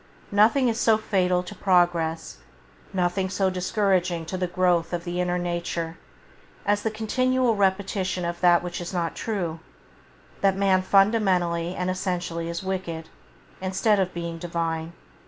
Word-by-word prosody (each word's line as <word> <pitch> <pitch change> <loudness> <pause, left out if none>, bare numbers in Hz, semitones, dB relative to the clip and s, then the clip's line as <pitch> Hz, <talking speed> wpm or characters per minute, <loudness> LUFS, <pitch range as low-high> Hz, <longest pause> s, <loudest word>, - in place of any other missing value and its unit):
Nothing 225 +6 +4
is 230 0 0
so 225 -1 +4
fatal 185 -4 +1
to - - -8
progress, 175 -3 +1 0.5
nothing 185 +1 0
so 190 0 +1
discouraging 185 -2 0
to 165 - -5
the 185 -1 -1
growth 175 -1 +1
of 170 -1 -2
the 175 0 -2
inner 180 0 0
nature, 170 -1 -3 0.7
as 205 +1 +2
the 220 - 0
continual 250 +2 +1
repetition 190 -2 0
of 170 0 -4
that 175 -1 +5
which 175 0 -5
is 175 +2 -6
not 170 -2 -1
true: 175 -7 -3 0.8
that 195 -1 +3
man 195 -1 +3
fundamentally 185 -4 +2
and 180 0 -1
essentially 175 -3 -3
is 170 +2 -4
wicked, 180 -4 -4 0.5
instead 195 +3 +2
of 185 -1 0
being 170 -1 -5
Divine. 165 -1 -3
180 Hz, 145 wpm, -25 LUFS, 170-195 Hz, 0.8 s, that